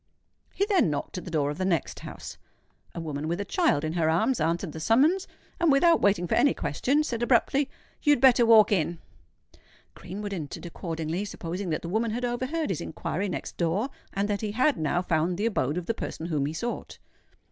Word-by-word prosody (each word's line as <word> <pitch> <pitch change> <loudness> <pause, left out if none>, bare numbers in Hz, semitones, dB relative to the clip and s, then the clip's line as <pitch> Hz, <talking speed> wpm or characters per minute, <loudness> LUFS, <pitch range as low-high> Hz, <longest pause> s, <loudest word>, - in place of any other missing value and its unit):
He 400 - +2
then 390 - +3
knocked 145 +5 -3
at - - -11
the - - -6
door 150 -3 0
of 150 - -7
the - - 0
next 175 -6 -1
house. - - -9 0.6
A - - -4
woman 155 -2 -4
with 170 +3 -2
a 205 - -2
child 315 - +1
in 155 0 -2
her 165 -2 +1
arms 220 +7 +1
answered 165 +2 0
the 160 - -7
summons; 290 - +3 0.3
and, 340 -3 +4
without 330 +4 +5
waiting 195 -3 +3
for - - -2
any 285 - +4
question, 290 +4 0
said 240 -6 -3
abruptly, 265 +3 +2 0.3
"You 295 - +5
had 290 - +1
better 250 -2 +6
walk 225 -3 +6
in." 175 -3 +1 1.0
Greenwood 200 +3 -6
entered 160 -2 -6
accordingly, 165 +1 -4
supposing 185 -1 -5
that 155 - -2
the - - -4
woman 225 +5 0
had 240 +3 -2
overheard 255 +3 -2
his 170 - -3
inquiry 190 +5 -3
next - - -5
door, 180 +9 0 0.2
and 200 +1 -1
that 205 -1 -1
he 210 -2 -3
had 255 +5 +3
now 160 +3 0
found 170 +1 0
the 210 - -1
abode 160 - 0
of 180 - -3
the 230 - 0
person 165 - -6
whom 150 -5 0
he 150 - -4
sought. 235 +9 -5
195 Hz, 210 wpm, -27 LUFS, 165-240 Hz, 1.0 s, better